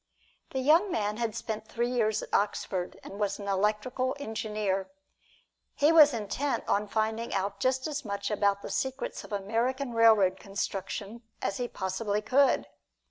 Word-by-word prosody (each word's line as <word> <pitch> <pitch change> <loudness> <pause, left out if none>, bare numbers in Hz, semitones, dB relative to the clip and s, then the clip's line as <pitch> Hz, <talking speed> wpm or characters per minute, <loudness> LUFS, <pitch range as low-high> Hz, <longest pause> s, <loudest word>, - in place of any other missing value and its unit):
The 265 - -2
young 325 +9 +5
man 210 -4 -1
had 230 -3 -2
spent 220 -1 -4
three 240 +2 -1
years 220 -4 +1
at - - -11
Oxford, 190 -3 -1
and 200 - -9
was 200 -1 0
an 200 - -7
electrical 210 +6 0
engineer. 215 -6 -2 0.9
He 295 +2 +4
was 305 -3 +8
intent 235 +3 -2
on 210 +1 +1
finding 220 +2 -1
out 200 +1 -2
just 260 +4 +1
as 295 -1 -3
much 200 -1 -3
about 200 -1 +1
the - - -6
secrets 265 0 -3
of - - -13
American 235 +6 -1
railroad 215 -5 +5
construction 200 +2 -4 0.2
as 195 0 -2
he 245 - -2
possibly 200 +1 -2
could. 270 +5 +3
215 Hz, 155 wpm, -29 LUFS, 200-255 Hz, 0.9 s, was